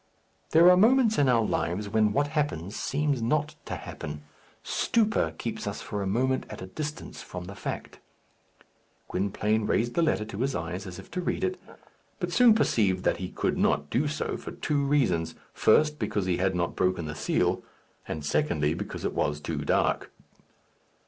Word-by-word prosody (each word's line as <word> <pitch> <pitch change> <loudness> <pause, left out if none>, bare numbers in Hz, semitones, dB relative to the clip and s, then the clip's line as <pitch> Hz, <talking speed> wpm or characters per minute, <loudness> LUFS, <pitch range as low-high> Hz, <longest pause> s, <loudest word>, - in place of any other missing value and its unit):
There 165 +2 +6
are 180 - +6
moments 225 +2 +5
in 140 -2 +4
our 115 -2 +4
lives 100 +2 -1
when 105 0 +2
what 145 +5 +1
happens 145 - -2
seems 145 -2 0
not 150 +6 0
to - - -4
happen. 75 0 -7 0.4
Stupor 210 - +1
keeps - - -4
us - - -4
for 105 - -4
a 100 - -2
moment 130 +6 0
at - - -8
a 95 - -6
distance 150 +10 -6
from 90 -1 -7
the 95 - -8
fact. 100 - -6 1.1
Gwynplaine 105 +3 0
raised 120 +1 +1
the 170 - +2
letter 155 -9 +1
to 100 -1 -7
his 135 +1 0
eyes, 90 +4 -4
as 90 - -7
if 95 - -12
to 180 - -2
read - - -2
it, 375 0 -1 0.6
but - - -2
soon 240 -3 +6
perceived 95 - +2
that - - +2
he 90 0 -5
could - - -1
not 75 0 +1
do 145 +5 +2
so 150 +1 -2
for - - -8
two 145 -2 0
reasons 95 - +1 0.2
first, 150 +6 +3
because 100 -3 -1
he 90 -2 +1
had 95 0 +1
not 85 -1 -1
broken 90 -2 +1
the 75 - -4
seal; - - 0 0.5
and, 75 -2 -4
secondly, 75 - +1
because 85 - -5
it - - -1
was 75 0 0
too - - -3
dark. - - +1
110 Hz, 180 wpm, -28 LUFS, 90-150 Hz, 1.1 s, There